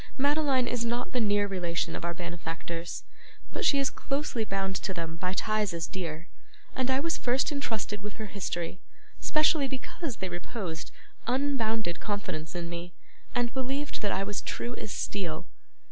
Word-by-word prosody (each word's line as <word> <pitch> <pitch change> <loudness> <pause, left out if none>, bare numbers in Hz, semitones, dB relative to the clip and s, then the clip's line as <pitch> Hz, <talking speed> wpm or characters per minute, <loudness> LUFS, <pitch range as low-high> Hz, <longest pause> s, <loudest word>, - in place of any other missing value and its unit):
'Madeline 280 -2 +4
is 240 -1 +1
not 240 +1 0
the 250 - +2
near 205 -2 +4
relation 175 -4 0
of - - -4
our 170 0 0
benefactors, 170 0 -3 0.5
but - - -1
she 280 - +6
is 275 -1 +3
closely 275 -5 0
bound 195 -2 0
to 190 -2 -2
them 165 -2 -2
by 180 +2 0
ties 210 -2 +2
as 165 -2 0
dear; 165 -1 -3 0.5
and 260 0 +2
I 260 0 +4
was 330 +3 +1
first 255 +5 +3
intrusted 225 -7 -1
with 210 0 -4
her 220 - -4
history, 185 -3 -2 0.4
specially 305 -2 +5
because 265 +1 -3
they 190 - -1
reposed 175 -1 -3 0.4
unbounded 230 -8 +2
confidence 180 -6 -2
in 170 -1 -1
me, 170 0 -5 0.4
and 240 -1 +2
believed 270 +2 -1
that 205 -2 +2
I 195 - +2
was 205 0 -2
as - - +1
true 240 - -2
as 210 - -3
steel. 175 -7 -1
205 Hz, 170 wpm, -31 LUFS, 175-255 Hz, 0.5 s, she